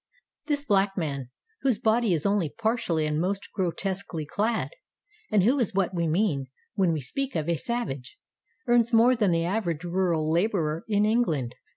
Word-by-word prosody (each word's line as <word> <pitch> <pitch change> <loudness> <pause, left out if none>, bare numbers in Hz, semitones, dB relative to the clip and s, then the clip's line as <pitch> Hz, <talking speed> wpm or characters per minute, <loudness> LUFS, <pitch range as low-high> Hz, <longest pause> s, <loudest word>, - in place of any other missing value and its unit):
This 290 -2 0
black 200 -5 +2
man, 140 -7 -3 0.3
whose 260 -6 +2
body 220 0 +2
is 155 - -3
only 200 -5 +2
partially 220 -7 0
and 150 +1 0
most 195 +2 -2
grotesquely 190 -3 -3
clad, 215 +8 -1 0.6
and 210 -3 +3
who 255 +7 +3
is 220 -6 0
what 195 -1 +1
we 170 -2 0
mean 155 -5 +1 0.3
when 190 -4 +2
we 155 -2 -1
speak 270 - -4
of 155 -1 -1
a 170 - +2
Savage, 150 - -4 0.5
earns 240 -1 +4
more 235 +2 +5
than 215 -5 +2
the 165 -1 +1
average 175 -4 -1
rural 175 -3 0
laborer 170 -2 0
in 210 -1 +2
England. 165 - +1
195 Hz, 170 wpm, -27 LUFS, 160-225 Hz, 0.6 s, more